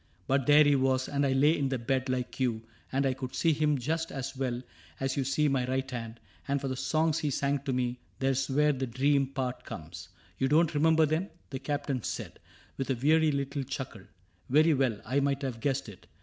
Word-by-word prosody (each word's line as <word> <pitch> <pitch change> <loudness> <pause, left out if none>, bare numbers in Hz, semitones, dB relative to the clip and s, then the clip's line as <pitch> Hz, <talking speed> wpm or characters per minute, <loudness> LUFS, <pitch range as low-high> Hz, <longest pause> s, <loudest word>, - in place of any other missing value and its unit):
But 135 -1 +1
there 150 +1 +8
he 145 -1 +4
was, 130 -1 +1
and 140 0 0
I 135 - +1
lay 145 +4 +4
in 140 -3 0
the 130 - 0
bed 130 +2 -1
Like 130 0 -2
you; 120 -4 0 0.3
and 135 +1 +1
I 135 - +2
could 130 -1 -6
see 165 -2 +3
him 150 -1 +2
just 160 +5 -2
as 135 0 -5
well 125 -2 -2 0.4
As 135 0 -1
you 140 - 0
see 150 +3 +1
my 130 -3 +1
right 130 +1 -1
hand. 115 -2 -6 0.3
And 140 0 +1
for 135 - -4
the 130 - -2
songs 155 +4 +1
He 150 - -1
sang 140 +1 0
to 135 - 0
me 125 -1 -1
— - - -36
there's 135 0 +1
where 150 +2 +3
the 130 -1 -3
dream 135 +3 +2
part 130 -2 -4
comes." 85 +3 -8
" 90 0 -30
You 135 - +2
don't 155 +3 +3
remember 160 +1 +4
them? 160 +6 -1
" - - -36
the 135 - -4
Captain 145 -3 -2
said, - - -5 0.4
With 135 - -3
a 135 - +2
weary 155 +5 +3
little 140 0 -2
chuckle; 130 -5 -6 0.3
'' - - -37
very 155 +4 +5
well, 130 -6 +1
I 135 +2 +1
might 140 0 0
have 125 -4 -3
guessed 135 +1 -1
it. 105 -4 -12
135 Hz, 235 wpm, -29 LUFS, 130-145 Hz, 0.4 s, there